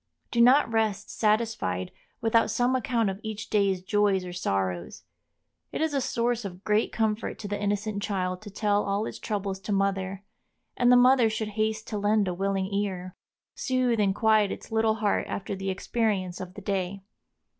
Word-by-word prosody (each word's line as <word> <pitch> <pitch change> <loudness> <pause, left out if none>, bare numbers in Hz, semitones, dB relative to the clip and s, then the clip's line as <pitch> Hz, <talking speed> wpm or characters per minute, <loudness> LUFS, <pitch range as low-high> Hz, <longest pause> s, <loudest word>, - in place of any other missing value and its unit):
Do 235 - +2
not 250 +1 +6
rest 215 -2 0
satisfied 210 - 0 0.3
without 225 0 +3
some 245 +1 +1
account 230 -4 +1
of 190 - -8
each 215 -1 -6
day's 195 -3 +2
joys 200 -1 +2
or 180 - -6
sorrows. 95 - -2 0.7
It - - -4
is 315 -1 0
a 275 - +1
source 240 -1 0
of 190 -1 -8
great 210 +1 +1
comfort 220 -1 -1
to 205 - -6
the 205 0 -3
innocent 205 0 -1
child 185 -3 -2
to 215 - -9
tell 205 0 +1
all 200 +2 -1
its - - -6
troubles 200 -3 -3
to 200 - -6
mother, 195 -1 0 0.5
and 245 0 +4
the - - +8
mother 250 -1 +6
should 220 0 -3
haste 215 +1 -1
to 210 - -2
lend 205 0 +2
a 180 - -1
willing 195 +1 -1
ear. 185 -3 -2 0.4
Soothe 255 -3 0
and 195 -2 +2
quiet 215 -2 +3
its - - -8
little 220 0 +2
heart 210 -2 0
after 200 0 -4
the 195 0 -3
experience 190 -2 -1
of 185 0 -8
the 205 - -8
day. 195 0 -2
205 Hz, 180 wpm, -27 LUFS, 195-225 Hz, 0.7 s, the